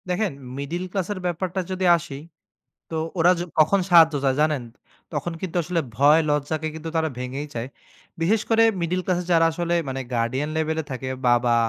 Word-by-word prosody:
দেখেন, 190 +2 0 0.3
মিডেল 165 +6 -3
ক্লাসের 195 0 -2
ব্যাপারটা 180 +1 -2
যদি 185 0 -1
আসি, 165 -5 -8 0.7
তো 165 - -5 0.2
ওরা 175 +2 +6
য - - -2 0.2
কখন 155 +6 +5
সাহায্য 165 -3 +7
চায় 135 -1 +2
জানেন? 150 -4 +1 0.5
তখন 175 - -2
কিন্তু 185 -2 -5
আসলে 175 +1 -1 0.2
ভয় 145 +6 +5
লজ্জাকে 150 +2 -1
কিন্তু 160 +1 -6
তারা 160 -1 +1
ভেঙেই 130 +4 -4
চায়। 115 +1 -4 0.5
বিশেষ 205 +6 +2
করে 225 0 +5 0.2
মিডেল 175 +2 0
ক্লাসে 180 -1 0
যারা 165 -1 +5
আসলে 170 +1 -1
মানে 135 0 -3
গার্ডিয়ান 120 +5 -1
লেভেলে 160 0 -1
থাকে, 130 0 -4 0.2
বাবা, 120 0 +3
160 Hz, 170 wpm, -23 LUFS, 140-175 Hz, 0.7 s, সাহায্য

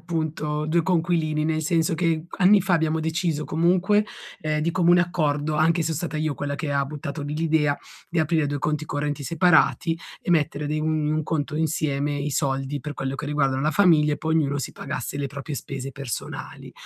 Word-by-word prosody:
appunto 155 -2 -2
2 165 +2 +2
coinquilini, 160 -3 +1
nel 160 0 0
senso 165 0 +1
che 165 -1 0
c - - -11
anni 195 +3 +6
fa 185 -1 +2
abbiamo 160 -1 +1
deciso 160 -1 -1
comunque, 180 +7 +2 0.4
ehm, 155 -1 -1
di 165 +2 +1
comune 175 0 +4
accordo, 155 -4 0
anche 160 +2 +3
se 160 - -1
so - - -2
stata 170 -2 -3
io 155 -1 -1
quella 140 -1 -3
che 155 -2 -3
ha 140 0 +1
buttato 145 +1 -6
lì 145 +1 -4
g 155 - -3
idea, 155 -3 +2 0.3
di 170 - -1
aprire 155 -1 +1
2 145 0 -2
conti 150 +2 -1
correnti 145 0 -3
separati 165 -2 +3 0.3
e - - -3
mettere 150 -2 +1
de 155 +1 -1
un 155 -1 0
un - - -1
conto 150 -1 -2
insieme 145 -2 0
i 145 +1 -2
soldi 135 +1 -1
per 150 +1 -6
quello 135 0 -3
che 145 - -5
riguardano 135 -3 +1
la 155 - +2
famiglia, 155 -5 +4
e - - -8
poi 160 0 -1
ognuno 145 -3 +1
si 135 - -4
pagasse 130 +3 -5
le 140 - -1
proprie 140 +2 -6
spese 135 +1 -5
personali. 135 -2 -6
155 Hz, 205 wpm, -24 LUFS, 145-165 Hz, 0.4 s, anni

